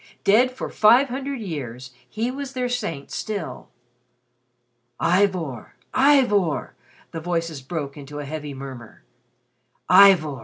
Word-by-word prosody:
Dead 230 +6 +4
for 255 - -6
five 245 +6 +5
hundred 270 +1 -4
years, 130 - -6 0.2
he 230 +3 -2
was 270 0 -6
their 250 -2 -1
saint 210 - -4
still. 215 -3 -5 1.3
"Ivor! 175 - 0 0.2
Ivor!" 250 - +3 0.4
the 165 - -5
voices 165 -3 -3
broke 140 0 -5
into 145 0 -9
a 145 - -5
heavy 150 -1 -6
murmur. 130 -4 -10 0.8
"Ivor! 180 -7 +6
175 Hz, 115 wpm, -23 LUFS, 145-240 Hz, 1.3 s, Ivor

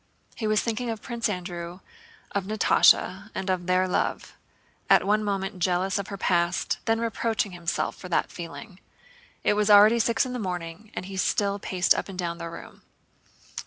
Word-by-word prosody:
He 220 - -3
was 215 0 +2
thinking 235 +1 -2
of 225 -2 -5
Prince 235 -2 -2
Andrew, 175 -2 -5 0.5
of 200 -2 -2
Natásha, 215 +2 +3
and 190 0 -1
of 180 -1 -2
their 185 0 +3
love, 180 - -2 0.6
at - - +5
one 210 +2 +2
moment 195 -1 -2
jealous 185 +2 +1
of 200 - -4
her 200 - -6
past, 175 -1 0
then 225 0 +2
reproaching 225 -2 -1
himself 175 -1 -2
for 180 - -9
that 170 - 0
feeling. 180 +3 -9 0.6
It - - +3
was 210 0 +1
already 210 +3 +7
six 230 +3 +2
in 255 - -5
the 250 - -3
morning 180 0 -5
and - - -4
he 195 0 -7
still 200 +1 +1
paced 185 -2 +2
up - - -4
and 190 - -8
down 170 -1 -3
the 170 0 -5
room. 165 - -11
195 Hz, 180 wpm, -26 LUFS, 180-215 Hz, 0.6 s, already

